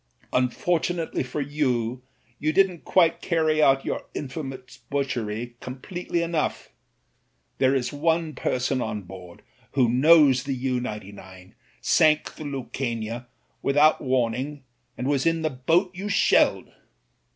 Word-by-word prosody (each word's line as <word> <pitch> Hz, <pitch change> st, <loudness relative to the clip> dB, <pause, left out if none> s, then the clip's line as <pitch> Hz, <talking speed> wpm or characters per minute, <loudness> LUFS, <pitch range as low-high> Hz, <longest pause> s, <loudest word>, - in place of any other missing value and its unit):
Unfortunately 165 Hz, +6 st, 0 dB
for 130 Hz, +3 st, -3 dB
you 130 Hz, -4 st, -1 dB, 0.4 s
you 155 Hz, +1 st, +1 dB
didn't 185 Hz, 0 st, +2 dB
quite 170 Hz, -3 st, +3 dB
carry 155 Hz, -3 st, +1 dB
out 135 Hz, -2 st, +4 dB
your -, -, -3 dB
infamous 130 Hz, -3 st, -6 dB
butchery 120 Hz, -4 st, -3 dB
completely 170 Hz, +7 st, -4 dB
enough. 165 Hz, -2 st, -2 dB, 0.9 s
There 130 Hz, +1 st, +3 dB
is 130 Hz, +2 st, -1 dB
one 160 Hz, +1 st, 0 dB
person 130 Hz, 0 st, -1 dB
on 105 Hz, -3 st, -3 dB
board 90 Hz, -1 st, -12 dB, 0.3 s
who 130 Hz, -4 st, +3 dB
knows 140 Hz, 0 st, +5 dB
the 135 Hz, -1 st, -2 dB
U 130 Hz, 0 st, -1 dB
99 95 Hz, -5 st, -9 dB, 0.3 s
sank 155 Hz, -1 st, +3 dB
the 155 Hz, -, -9 dB
Lucania 120 Hz, -4 st, -4 dB, 0.3 s
without 145 Hz, +3 st, +4 dB
warning 130 Hz, +2 st, -1 dB, 0.3 s
and 125 Hz, -, -4 dB
was 140 Hz, +1 st, +1 dB
in 165 Hz, -1 st, +1 dB
the 155 Hz, -, 0 dB
boat 165 Hz, +9 st, +1 dB
you 195 Hz, +3 st, -5 dB
shelled." 200 Hz, -, +3 dB
135 Hz, 125 wpm, -25 LUFS, 125-155 Hz, 0.9 s, knows